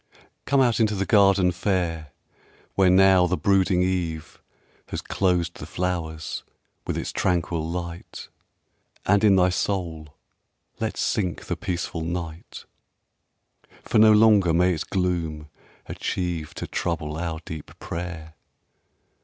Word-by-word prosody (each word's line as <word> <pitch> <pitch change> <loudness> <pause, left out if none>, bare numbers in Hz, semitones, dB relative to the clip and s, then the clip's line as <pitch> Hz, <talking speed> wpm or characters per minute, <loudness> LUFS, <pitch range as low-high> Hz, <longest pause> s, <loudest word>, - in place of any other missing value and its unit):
X - - -26 0.2
Come 140 -1 +3
out 120 -3 +2
into 110 -2 +2
the 100 0 -1
garden 100 -4 +4
fair 85 -4 -2 0.6
Where 95 -2 +4
now 95 -1 +5
the 90 +1 0
brooding 95 -2 +2
eve 85 -4 -3 0.5
Has - - -4
closed 90 -2 0
the - - -8
flowers 80 -4 -3 0.4
with - - -2
its - - -3
tranquil 85 -2 0
light, 85 0 -6 0.8
And 100 +1 +3
in 100 -3 +6
thy 90 -1 +4
soul 85 -5 -3 0.6
let - - -3
sink 90 -6 -1
the - - -2
peaceful 85 -2 -4
night; 85 0 -6 1.2
For - - +1
no 110 0 +8
longer 105 -6 +5
may 90 +2 +3
its 80 - -3
gloom 85 -5 -2 0.4
achieve 85 -4 -3
To - - -5
trouble 80 -3 -3
our 80 -1 -3
deep 80 -2 -9
prayer. 85 -2 -6
90 Hz, 130 wpm, -24 LUFS, 80-95 Hz, 1.2 s, no